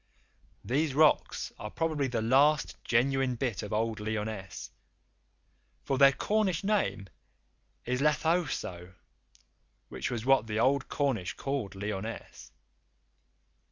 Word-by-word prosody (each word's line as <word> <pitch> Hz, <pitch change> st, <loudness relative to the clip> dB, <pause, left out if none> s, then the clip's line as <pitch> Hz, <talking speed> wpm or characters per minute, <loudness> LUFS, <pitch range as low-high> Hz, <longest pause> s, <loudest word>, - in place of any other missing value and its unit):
These 140 Hz, +2 st, 0 dB
rocks 155 Hz, 0 st, +3 dB
are 105 Hz, -, -5 dB
probably 155 Hz, 0 st, -1 dB
the 120 Hz, -3 st, -2 dB
last 140 Hz, +5 st, +3 dB
genuine 130 Hz, +1 st, +1 dB
bit 120 Hz, -6 st, -2 dB
of 105 Hz, -, -7 dB
old 110 Hz, 0 st, -1 dB
Lyonesse, 105 Hz, -3 st, -5 dB, 1.1 s
for 135 Hz, -1 st, -1 dB
their 140 Hz, -1 st, +8 dB
Cornish 190 Hz, +4 st, 0 dB
name 195 Hz, -, 0 dB, 0.8 s
is 125 Hz, +2 st, -1 dB
Lethowsow, 145 Hz, -, 0 dB, 0.9 s
which -, -, -4 dB
was 115 Hz, -2 st, -4 dB
what 135 Hz, -4 st, +4 dB
the 105 Hz, -1 st, -3 dB
old 135 Hz, +3 st, +2 dB
Cornish 125 Hz, -, -1 dB
called 135 Hz, -8 st, -4 dB
Lyonesse. 105 Hz, +2 st, -6 dB
130 Hz, 110 wpm, -30 LUFS, 110-145 Hz, 1.1 s, their